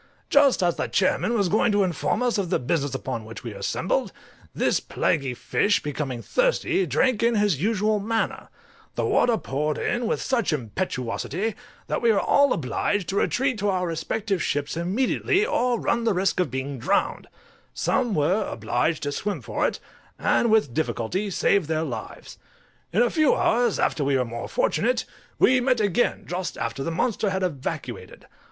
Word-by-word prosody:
Just 280 -8 +5
as 175 -1 +1
the - - -1
chairman 205 +4 +1
was 200 -4 +2
going 215 +4 +2
to 205 -1 +3
inform 180 +6 -1
us 240 -4 +1
of 185 -4 -2
the - - +2
business 140 +1 -1
upon 130 -3 -4
which 110 -1 -10
we - - -6
were - - -10
assembled, - - -1 0.4
this - - +1
plaguy 135 -5 -1
fish, 205 - +1
becoming 140 -5 -4
thirsty, 435 -7 +1
drank 255 -4 +2
in 235 0 +3
his 205 -9 +1
usual 210 +1 +1
manner; 225 +2 -2 0.5
the - - 0
water 235 -2 +3
poured 150 -1 -2
in 240 -1 -1
with - - 0
such 250 -7 0
impetuosity, 150 - -3 0.3
that - - -2
we 235 - +4
were 205 - +3
all 285 -1 +3
obliged 165 - -1
to 195 - -2
retreat 255 0 +1
to 205 0 +1
our 185 -2 0
respective 195 +3 -2
ships 145 0 -1
immediately, 245 - +1
or 250 - +1
run 235 - 0
the 225 -4 +1
risk 185 0 +1
of 180 - +1
being 130 +1 -4
drowned; 190 - 0 0.5
some 245 -6 0
were 180 +8 +2
obliged 120 +8 -1
to 145 - -1
swim 195 +3 -3
for 115 - -1
it, - - -4 0.4
and 235 - +2
with 215 - +3
difficulty 160 - -1
saved 195 -2 +2
their 160 0 0
lives. 120 -8 -7 0.5
In 210 +8 +3
a 240 - +1
few 310 -3 +3
hours 235 -2 +2
after 150 - 0
we 140 -1 +2
were 125 - 0
more 115 0 -6
fortunate, - - +1 0.3
we 255 0 +4
met 250 -1 +2
again 210 +2 +1
just 180 +1 -4
after 115 +4 -3
the 165 - -2
monster 205 +5 0
had 190 0 -1
evacuated. 145 -8 -5
190 Hz, 175 wpm, -24 LUFS, 145-230 Hz, 0.5 s, Just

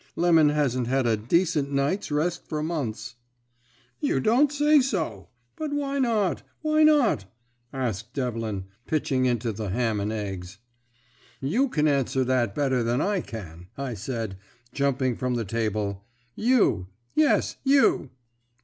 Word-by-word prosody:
'Lemon 165 -3 +5
hasn't 130 -5 0
had 130 0 +1
a 115 -2 +3
decent 145 - +1
night's 140 +8 0
rest 160 +4 -1
for 150 -1 -3
months.' 120 -8 -3 0.9
"'You - - +1
don't 250 - +3
say 295 +1 +4
so! 160 - -2 0.3
But 305 -2 -4
why 280 -1 -1
not, 220 -8 +1 0.2
why 310 0 +2
not?' 290 - +4 0.5
asked 115 -6 -3
Devlin, 115 -7 -2 0.2
pitching 140 -4 +1
into 120 -1 0
the 105 -1 -5
ham 110 +1 0
and 100 +2 -2
eggs. 95 -3 -5 0.8
"'You 230 - +1
can 155 -8 +1
answer 135 -2 +1
that 125 -5 0
better 130 -3 +1
than 120 +2 0
I 200 +2 +1
can,' 90 - -9
I 135 -3 -3
said, 110 -3 -4 0.3
jumping 135 -3 0
from 125 -1 -1
the 115 -2 -2
table; 105 -2 -2 0.3
'You; 220 - +2 0.3
yes, 310 -2 +2
you!' 270 - +3
135 Hz, 140 wpm, -26 LUFS, 110-175 Hz, 0.9 s, Lemon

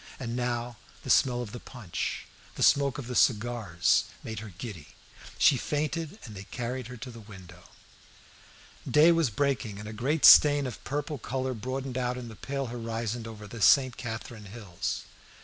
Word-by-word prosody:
And 120 -2 -4
now 120 -1 -2 0.3
the - - -1
smell 125 -2 +3
of 105 - -8
the 120 - -7
punch, 110 -10 -5 0.3
the - - -1
smoke 140 -2 +4
of 140 - -6
the 125 - -5
cigars, 110 -7 +2 0.2
made 110 -2 -5
her 110 -1 -9
giddy. 100 - -7 0.5
She 140 - +5
fainted, 155 - -2
and 110 - -9
they 95 +1 -8
carried 125 +2 -4
her 125 0 -9
to 125 +2 -8
the 115 - -11
window. 95 -5 -13 1.2
Day 155 +3 +6
was 165 -5 +2
breaking, 120 -3 -1
and 105 +1 -8
a 110 - -6
great 135 +8 +1
stain 145 -1 +8
of 125 -4 -7
purple 145 +1 -3
colour 130 +2 -2
broadened 130 +2 -4
out 125 0 -1
in 120 -2 -7
the 110 - -10
pale 135 +4 -4
horizon 115 -1 -4
over 105 -2 -9
the 110 +2 -9
St. 130 +2 +5
Catherine 110 -2 -7
hills. 100 -4 -5
120 Hz, 175 wpm, -28 LUFS, 110-135 Hz, 1.2 s, stain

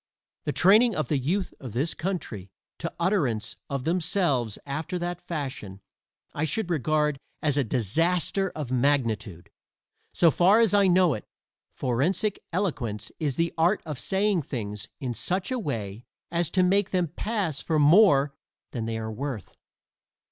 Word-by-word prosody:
The - - 0
training 215 +6 +5
of 155 - -2
the 150 - +2
youth 180 +9 -1
of 125 -6 -8
this 140 +8 0
country 150 - -4 0.3
to 170 - -3
utterance 160 - 0
of 140 -2 -2
themselves 160 - +1
after 155 +6 -3
that 175 0 -4
fashion 135 - -5 0.5
I 145 - -2
should 180 +4 -1
regard 150 -1 +1 0.2
as 150 -3 +2
a 145 - +2
disaster 165 - 0
of 145 -5 -5
magnitude. 115 - 0 0.6
So 170 -2 +4
far 190 +8 +5
as 225 -4 +4
I 200 -1 +5
know 180 -3 +4
it, 105 - -5 0.5
forensic 165 - 0
eloquence 125 - -2
is 145 -5 -1
the 165 +3 0
art 175 +6 +3
of 150 -5 -5
saying 195 +2 +1
things 105 -8 -5
in 125 -3 -3
such 185 - -2
a 255 - 0
way 115 - -4 0.3
as 170 -2 0
to 185 +1 +2
make 195 +2 +3
them 180 -2 +1
pass 185 -4 -2
for 160 - 0
more 145 -3 +5 0.4
than 115 -3 -3
they 115 0 -2
are 110 0 -4
worth. 120 - -5
155 Hz, 155 wpm, -26 LUFS, 125-180 Hz, 0.6 s, training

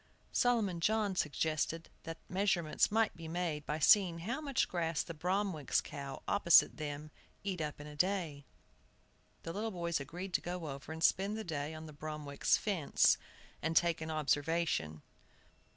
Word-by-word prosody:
Solomon 220 -8 +2
John 210 +2 +1
suggested 160 +1 -1 0.2
that 165 0 -5
measurements 185 -4 +2
might 220 0 +2
be 165 -1 -8
made 165 -3 -2
by 150 - -1
seeing 170 +1 +5
how 235 - -3
much 280 -3 +1
grass 165 -3 -1
the 165 - -7
Bromwicks' 180 -2 0
cow, 140 -2 -7
opposite 170 -4 +5
them, 150 0 -5 0.3
eat 190 -4 -2
up 150 -1 -4
in 145 - -8
a 150 0 -9
day. 170 -4 0 1.0
The 165 - -5
little 215 +4 -2
boys 170 -5 -1
agreed 175 +7 -6
to - - +2
go 175 -3 -4
over 140 +3 -7
and 160 +1 -5
spend 200 +5 +3
the 220 - -4
day 155 -3 -3
on 155 0 -8
the 155 - -10
Bromwicks' 150 -1 0
fence, 190 -9 +3 0.4
and 165 0 +1
take 170 -2 +3
an 160 - -4
observation. 150 - 0
165 Hz, 160 wpm, -34 LUFS, 150-190 Hz, 1.0 s, seeing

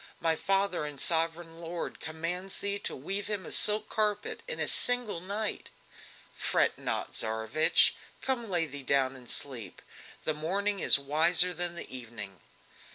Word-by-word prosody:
My 165 -1 +1
father 195 -2 0
and 150 -2 -5
sovereign 165 +1 +1
lord 170 0 -5
commands 170 +4 -4
thee 200 0 0
to - - -4
weave 195 +9 -3
him 205 -3 -3
a - - -8
silk 215 0 +5
carpet 210 -1 -1
in - - -3
a - - +1
single 245 -7 +2
night!" 205 +3 -4 0.7
"Fret - - +2
not, - - -2
Tsarevich! 110 +7 +3 0.3
come, 240 -4 -2
lay 175 -3 +3
thee 145 -2 -8
down 135 -1 +1
and 125 -2 -12
sleep. 125 -7 -3 0.4
The 155 - +1
morning 195 +6 0
is - - +5
wiser 165 +6 +3
than 175 0 0
the 170 - -5
evening!" 110 -6 -8
170 Hz, 155 wpm, -30 LUFS, 145-200 Hz, 0.7 s, silk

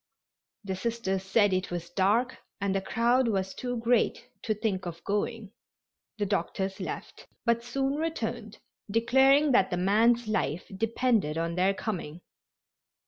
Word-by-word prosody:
The 190 -1 -3
Sisters 195 -2 -2
said 195 +1 +2
it 185 0 -1
was 175 -1 -5
dark 210 +7 +1 0.2
and 200 -1 0
the 195 - 0
crowd 235 +5 +2
was 190 -3 -1
too 245 -1 -4
great 235 0 +1
to 215 - -1
think 200 -4 -2
of 170 0 -7
going. 210 +1 -2 0.7
The 205 - 0
doctors 190 0 -2
left, - - -7 0.2
but 235 0 +2
soon 270 +3 -1
returned, 325 +1 -3 0.3
declaring 265 +6 +4
that 195 -6 +4
the 180 - -1
man's 225 +5 +3
life 180 -6 -1
depended 225 -6 +1
on 165 +1 -1
their 185 +3 +2
coming. 175 -6 -5
210 Hz, 140 wpm, -28 LUFS, 190-235 Hz, 0.7 s, declaring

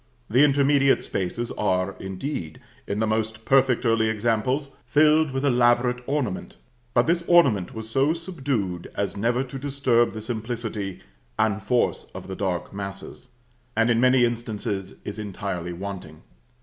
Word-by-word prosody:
The 130 +5 +6
intermediate 140 -1 +4
spaces 110 +6 -3
are, 95 -1 0
indeed, 95 - -5 0.3
in 100 - -2
the 110 - +1
most 110 0 -2
perfect 135 -2 +3
early 115 -1 +3
examples, 120 +6 0
filled 155 +3 +4
with 135 +1 -2
elaborate 125 -1 +3
ornament; 135 -10 -2 0.4
but 120 - +5
this 170 +1 +1
ornament 130 - +4
was 110 0 -6
so 135 +7 +2
subdued 135 - -3
as 100 - -2
never 120 +5 +1
to 135 +1 -7
disturb 135 -4 +1
the 110 - -6
simplicity 110 -4 -4 0.4
and 110 -1 +1
force 120 +5 0
of - - -8
the 95 - -5
dark 95 -2 -2
masses; 100 +3 -8 0.4
and 115 +1 +4
in 115 0 +3
many 125 -1 +5
instances 110 -4 -3
is 105 - -5
entirely 95 -4 -4
wanting. 90 -4 -7
115 Hz, 145 wpm, -25 LUFS, 100-135 Hz, 0.4 s, The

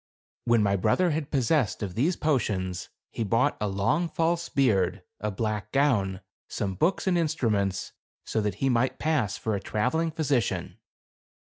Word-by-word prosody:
When 115 -2 +4
my 100 -1 +2
brother 135 - +2
had 150 -1 -2
possession 130 - +1
of 95 -3 -4
these 150 - +1
potions, 100 - -1 0.2
he 115 - -2
bought 115 +7 +2
a 105 - +1
long 100 - 0
false 165 +2 0
beard, 110 -9 +1 0.2
a 105 - -2
black 105 0 -3
gown, 105 -9 +1 0.3
some 95 -2 -3
books 170 - +1
and 180 -2 +2
instruments, 105 - 0 0.3
so 110 - -1
that 105 -3 -1
he 135 +6 0
might 125 0 +1
pass 135 -11 0
for 110 - -2
a 100 - 0
traveling 125 +12 0
physician. 145 -8 -1
115 Hz, 155 wpm, -27 LUFS, 100-155 Hz, 0.3 s, When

